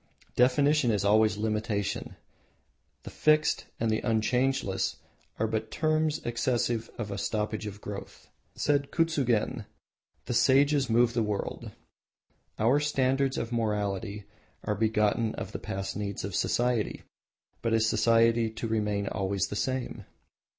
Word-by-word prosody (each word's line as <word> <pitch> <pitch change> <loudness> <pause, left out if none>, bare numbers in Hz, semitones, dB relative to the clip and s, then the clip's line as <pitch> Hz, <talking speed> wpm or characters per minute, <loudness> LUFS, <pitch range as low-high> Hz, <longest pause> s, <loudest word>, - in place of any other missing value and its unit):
Definition 140 +2 +3
is 105 -2 +1
always 105 0 +4
limitation 110 -1 -2 0.9
the - - -8
"fixed" 155 0 +2
and 115 -1 +1
"unchangeless" 115 -1 0 0.4
are 110 - +1
but 110 0 -2
terms 155 -1 0
expressive 120 -1 0
of 110 -4 -4
a 100 - -3
stoppage 105 +1 -2
of 105 0 -8
growth. 100 -1 -8 0.3
Said 140 -1 +1
Kuzugen, 140 -10 0 0.6
"The - - -2
Sages 140 +2 +4
move 120 +1 +3
the 120 - +1
world." 105 -2 -3 0.9
Our 120 +6 +3
standards 135 -2 +1
of 115 - -3
morality 105 -2 -2 0.4
are 105 - 0
begotten 110 +1 +1
of - - -6
the - - -5
past 95 0 -4
needs 100 -1 -4
of 100 0 -4
society, 120 0 0 0.6
but 115 - -1
is 110 0 +3
society 115 +1 +3
to 110 +1 -5
remain 105 -2 0
always 95 -1 -1
the - - -4
same? 130 +3 -3
115 Hz, 130 wpm, -28 LUFS, 105-130 Hz, 0.9 s, always